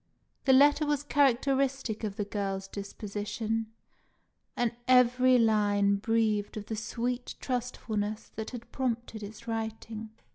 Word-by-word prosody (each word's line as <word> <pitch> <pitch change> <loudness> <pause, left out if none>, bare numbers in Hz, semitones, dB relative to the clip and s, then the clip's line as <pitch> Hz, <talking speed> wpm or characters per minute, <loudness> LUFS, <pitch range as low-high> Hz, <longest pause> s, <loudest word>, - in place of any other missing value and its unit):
The 265 - +6
letter 290 +3 +5
was 290 -1 +1
characteristic 270 -4 +1
of 205 -2 -2
the 205 -1 -2
girl's 195 -1 -3
disposition, 210 +2 -4 0.9
and 240 -2 +2 0.2
every 255 0 +5
line 205 -3 +3
breathed 215 -1 0
of 210 - -5
the 220 - -4
sweet 245 +3 -3
trustfulness 220 -4 -3
that 220 0 -6
had 240 -2 -9
prompted 235 -4 -2
its 215 +3 -9
writing. 225 -1 -4
225 Hz, 120 wpm, -30 LUFS, 210-250 Hz, 0.9 s, The